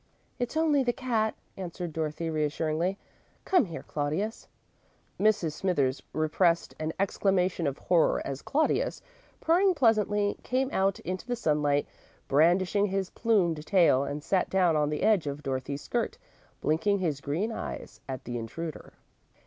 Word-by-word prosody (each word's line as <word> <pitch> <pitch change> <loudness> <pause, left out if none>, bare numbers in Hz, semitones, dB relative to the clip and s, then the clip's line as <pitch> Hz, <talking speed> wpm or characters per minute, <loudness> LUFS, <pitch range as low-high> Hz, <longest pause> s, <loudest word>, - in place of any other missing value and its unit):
"It's 245 +5 -2
only 310 -3 +3
the 245 -2 +1
cat," 230 -5 0 0.2
answered 175 -2 -5
Dorothy, 160 +1 -2
reassuringly. 155 +4 0 0.5
"Come 360 -9 +4
here, 165 -3 -7
Claudius." 155 +10 -3 0.7
Mrs. 205 -6 +2
Smithers 145 -6 0
repressed 165 +2 +1
an 155 0 -2
exclamation 185 -3 +1
of 140 0 -2
horror 175 -3 +2
as 135 0 -4
Claudius, 305 +3 0 0.4
purring 365 +3 +3
pleasantly, 210 -5 +2
came 260 +2 -1
out 195 0 +1
into 185 +6 -5
the 245 - 0
sunlight, 150 -8 +1 0.4
brandishing 180 +7 +3
his 195 -1 -2
plumed 175 -9 +1
tail, 170 -8 +4
and 145 +1 -4
sat 185 +1 +1
down 180 -4 +3
on 150 -1 +2
the 150 - -2
edge 205 -8 +3
of 145 +1 -4
Dorothy's 135 +1 -3
skirt, 240 - -2 0.4
blinking 185 +7 +2
his 160 -7 -1
green 170 +12 -1
eyes - - -6
at 130 -1 -5
the 120 -1 -3
intruder. 155 +8 -6
175 Hz, 140 wpm, -28 LUFS, 150-210 Hz, 0.7 s, Come